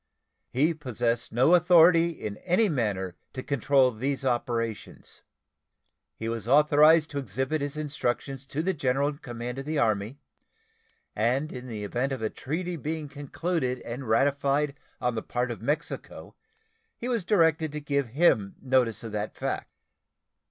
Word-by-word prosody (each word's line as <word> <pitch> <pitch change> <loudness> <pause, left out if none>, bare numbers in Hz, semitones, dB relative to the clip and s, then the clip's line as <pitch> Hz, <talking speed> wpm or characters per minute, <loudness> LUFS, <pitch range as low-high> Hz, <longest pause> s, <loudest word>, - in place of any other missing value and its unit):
He 150 +6 +2
possessed 120 -5 -2
no 130 +9 +4
authority 170 -1 +6
in 105 -11 -6
any 190 +4 +2
manner 100 - -1 0.2
to 130 - -5
control 135 -1 +3
these 135 +4 -3
operations. 120 -3 -3 0.9
He 110 - -5
was 115 -2 -4
authorized 150 +3 +5
to 145 - -2
exhibit 135 +2 -2
his 145 +1 -3
instructions 135 -2 -3
to 150 +4 -3
the 190 +2 +1
general 140 -2 +1
in 145 -1 -8
command 120 0 -6
of 135 - -6
the 155 +1 -2
Army, 110 +1 0 1.0
and 125 +8 0
in 125 0 -7
the 110 -4 -5
event 120 +6 -1
of 130 -4 -3
a 110 - -1
treaty 175 +5 -4
being 155 0 -4
concluded 145 -2 -2
and 120 +1 -6
ratified 140 +4 +2 0.3
on 125 0 0
the 110 - -3
part 125 +2 -2
of 115 - -7
Mexico 145 +4 -4 0.6
he 240 - -6
was 235 -6 0
directed 165 -5 +2
to 150 - -4
give 140 -2 -1
him 115 - +2
notice 125 -5 +1
of 115 - -6
that 105 0 -4
fact. - - -3
135 Hz, 150 wpm, -27 LUFS, 120-155 Hz, 1.0 s, authority